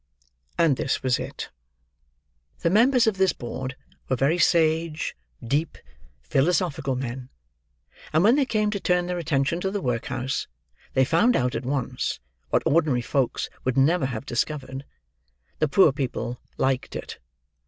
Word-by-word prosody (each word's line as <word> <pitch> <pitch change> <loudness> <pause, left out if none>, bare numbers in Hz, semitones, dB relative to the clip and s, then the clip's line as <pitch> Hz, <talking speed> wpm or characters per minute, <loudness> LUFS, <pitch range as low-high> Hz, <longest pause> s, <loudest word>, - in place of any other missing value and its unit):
And 165 -6 +3
this 130 - -1
was 130 -2 +2
it: - - -6 1.1
The 170 - +2
members 245 +4 +5
of 220 -3 +1
this 190 -1 +3
board 130 +2 -5 0.3
were 130 - +2
very 140 +8 +1
sage, 160 -2 +2 0.3
deep, 145 +7 -1 0.5
philosophical 140 - +1
men; 125 0 -5 0.8
and 160 +3 +3
when 225 +5 +6
they 280 -2 +2
came 215 -3 +1
to 200 - -2
turn 180 -1 +1
their 180 0 -2
attention 155 +1 0
to 190 - 0
the 205 +1 -2
workhouse, 125 -1 -2 0.5
they 130 - +5
found 175 - +3
out 125 -1 +1
at 125 - -4
once, 130 -2 -2 0.3
what - - +2
ordinary 150 -6 +3
folks 130 0 0 0.2
would 130 0 -1
never 140 +1 +3
have 120 -1 -5
discovered—the 130 - -5
poor 160 +1 +5
people 125 -3 -4 0.2
liked 130 -1 0
it! - - -7
140 Hz, 145 wpm, -25 LUFS, 130-175 Hz, 1.1 s, when